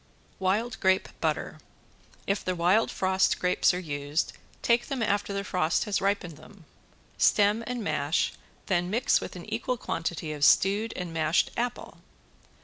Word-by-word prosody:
~WILD 210 Hz, +5 st, 0 dB
GRAPE 190 Hz, -1 st, +2 dB
BUTTER~ -, -, -2 dB, 0.7 s
If 200 Hz, +1 st, -1 dB
the 185 Hz, -, -1 dB
wild 180 Hz, +6 st, +3 dB
frost 190 Hz, 0 st, +1 dB
grapes 180 Hz, 0 st, +3 dB
are 180 Hz, -, -3 dB
used, 145 Hz, -2 st, -2 dB, 0.3 s
take 235 Hz, 0 st, +2 dB
them 265 Hz, -4 st, -2 dB
after 205 Hz, -1 st, 0 dB
the 200 Hz, 0 st, -2 dB
frost 175 Hz, -3 st, 0 dB
has 210 Hz, -3 st, -1 dB
ripened 195 Hz, -5 st, -1 dB
them. 195 Hz, -6 st, -16 dB, 0.5 s
Stem 210 Hz, +2 st, +4 dB
and 245 Hz, -2 st, -3 dB
mash, 155 Hz, -1 st, 0 dB, 0.3 s
then 175 Hz, -2 st, 0 dB
mix 235 Hz, +6 st, +2 dB
with -, -, -7 dB
an -, -, -8 dB
equal 250 Hz, -, -1 dB
quantity 165 Hz, -5 st, -3 dB
of 145 Hz, -1 st, -5 dB
stewed 205 Hz, +8 st, +4 dB
and 180 Hz, -2 st, -5 dB
mashed 160 Hz, +1 st, +1 dB
apple. 245 Hz, +1 st, -4 dB
190 Hz, 150 wpm, -27 LUFS, 170-210 Hz, 0.7 s, Stem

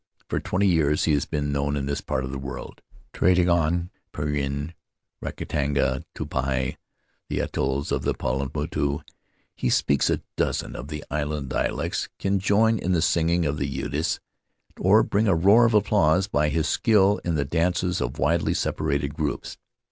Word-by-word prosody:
For -, -, 0 dB
twenty 100 Hz, +3 st, 0 dB
years 80 Hz, -5 st, +3 dB
he 80 Hz, -, +2 dB
has 70 Hz, -, +1 dB
been 75 Hz, -1 st, -2 dB
known 70 Hz, +1 st, 0 dB
in 70 Hz, -, -2 dB
this 70 Hz, 0 st, -2 dB
part 65 Hz, -, -2 dB
of 65 Hz, -, -5 dB
the 70 Hz, -, -4 dB
world 65 Hz, 0 st, -7 dB, 0.2 s
— -, -, -29 dB
trading 90 Hz, 0 st, +3 dB
on 85 Hz, +1 st, +1 dB, 0.2 s
Penrhyn, 75 Hz, +1 st, -2 dB, 0.5 s
Rakahanga, 70 Hz, -1 st, -1 dB
Tupuai, 65 Hz, -1 st, -2 dB, 0.5 s
the -, -, -1 dB
atolls 70 Hz, +2 st, -2 dB
of -, -, 0 dB
the -, -, -1 dB
Pau 65 Hz, +2 st, -2 dB
motu. 75 Hz, -1 st, -1 dB, 0.5 s
He -, -, -1 dB
speaks 70 Hz, +2 st, +2 dB
a -, -, 0 dB
dozen -, -, -1 dB
of 70 Hz, -, -6 dB
the 75 Hz, -1 st, -6 dB
island 75 Hz, -1 st, -2 dB
dialects, -, -, -1 dB
can 100 Hz, 0 st, 0 dB
join 110 Hz, +3 st, +3 dB
in 90 Hz, +1 st, 0 dB
the 85 Hz, -, +2 dB
singing 85 Hz, 0 st, +2 dB
of 75 Hz, +1 st, -1 dB
Utss, -, -, -2 dB, 0.6 s
or 105 Hz, +4 st, +5 dB
bring 105 Hz, +2 st, +1 dB
a 95 Hz, -, +4 dB
roar 100 Hz, +8 st, +6 dB
of 115 Hz, -, +1 dB
applause 95 Hz, -4 st, +3 dB
by 75 Hz, -6 st, +1 dB
his 80 Hz, +1 st, 0 dB
skill 105 Hz, +2 st, +3 dB
in 85 Hz, -2 st, -1 dB
the 70 Hz, -2 st, 0 dB
dances 90 Hz, +4 st, 0 dB
of 65 Hz, -, -3 dB
widely -, -, +1 dB
separated 70 Hz, 0 st, -1 dB
groups. 75 Hz, -1 st, -3 dB
75 Hz, 170 wpm, -25 LUFS, 70-90 Hz, 0.6 s, roar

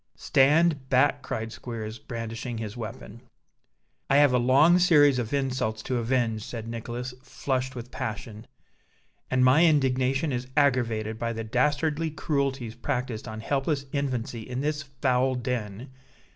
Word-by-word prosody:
"Stand 145 Hz, 0 st, +3 dB
back!" 135 Hz, +2 st, +3 dB
cried 110 Hz, -3 st, -4 dB
Squeers, 115 Hz, -2 st, -6 dB
brandishing 115 Hz, +1 st, -5 dB
his 110 Hz, -2 st, -5 dB
weapon. 115 Hz, -1 st, -8 dB, 0.9 s
"I 140 Hz, -, +4 dB
have 145 Hz, -2 st, +5 dB
a 125 Hz, -, +4 dB
long 140 Hz, +8 st, +5 dB
series 145 Hz, -7 st, +5 dB
of 115 Hz, -2 st, -3 dB
insults 130 Hz, -6 st, -1 dB
to 130 Hz, -, -1 dB
avenge," 115 Hz, -2 st, 0 dB
said 115 Hz, -1 st, -6 dB
Nicholas, 120 Hz, +2 st, -5 dB
flushed 130 Hz, 0 st, -3 dB
with 125 Hz, 0 st, -8 dB
passion; 110 Hz, -3 st, -6 dB, 0.8 s
"and 130 Hz, 0 st, +3 dB
my 140 Hz, +6 st, +6 dB
indignation 135 Hz, 0 st, +1 dB
is 125 Hz, 0 st, -3 dB
aggravated 115 Hz, -6 st, +1 dB
by 115 Hz, 0 st, -2 dB
the 115 Hz, 0 st, -4 dB
dastardly 150 Hz, +7 st, 0 dB
cruelties 140 Hz, -6 st, -2 dB
practised 120 Hz, -1 st, -3 dB
on 110 Hz, -1 st, -6 dB
helpless 140 Hz, +3 st, -1 dB
infancy 125 Hz, -5 st, -2 dB
in 125 Hz, +3 st, -5 dB
this 150 Hz, +1 st, -1 dB
foul 130 Hz, -2 st, 0 dB
den. 120 Hz, -1 st, -4 dB
125 Hz, 140 wpm, -26 LUFS, 115-140 Hz, 0.9 s, my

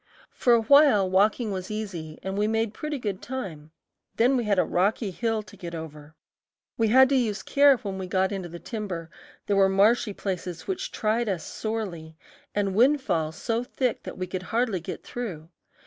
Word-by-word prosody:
For 245 Hz, -, +3 dB
a 230 Hz, -1 st, +4 dB
while 280 Hz, -6 st, +6 dB
walking 205 Hz, +4 st, +2 dB
was 185 Hz, -1 st, -4 dB
easy 185 Hz, -8 st, -5 dB
and 190 Hz, 0 st, -3 dB
we 205 Hz, +1 st, +1 dB
made 225 Hz, 0 st, 0 dB
pretty 300 Hz, +5 st, -4 dB
good 205 Hz, -7 st, -4 dB
time; 185 Hz, -, -6 dB, 0.5 s
then 250 Hz, +4 st, +3 dB
we 240 Hz, -3 st, 0 dB
had 205 Hz, -2 st, +2 dB
a -, -, +5 dB
rocky 200 Hz, +3 st, 0 dB
hill 225 Hz, +2 st, -1 dB
to 205 Hz, -, -15 dB
get 170 Hz, -3 st, -7 dB
over. 155 Hz, -1 st, -9 dB, 0.6 s
We 225 Hz, -, +2 dB
had 260 Hz, +4 st, +7 dB
to 280 Hz, -, +2 dB
use 225 Hz, -5 st, 0 dB
care 280 Hz, -1 st, +5 dB
when 195 Hz, -4 st, -5 dB
we 185 Hz, -, -4 dB
got 190 Hz, +1 st, +1 dB
into 190 Hz, -3 st, -4 dB
the 170 Hz, -, -8 dB
timber; 180 Hz, -6 st, -5 dB, 0.3 s
there 205 Hz, -, +1 dB
were 195 Hz, -1 st, +5 dB
marshy 205 Hz, +3 st, +3 dB
places 180 Hz, -3 st, -5 dB
which 380 Hz, -, -3 dB
tried 220 Hz, +1 st, 0 dB
us 185 Hz, -4 st, -2 dB
sorely, 180 Hz, -8 st, -5 dB, 0.4 s
and 200 Hz, -2 st, 0 dB
windfall 215 Hz, -, +2 dB
so 230 Hz, +8 st, -2 dB
thick 250 Hz, 0 st, -2 dB
that -, -, -8 dB
we 185 Hz, -, -2 dB
could 185 Hz, 0 st, -4 dB
hardly 225 Hz, -5 st, +1 dB
get 165 Hz, -, -7 dB
through. 180 Hz, -10 st, -6 dB
205 Hz, 190 wpm, -26 LUFS, 185-230 Hz, 0.6 s, had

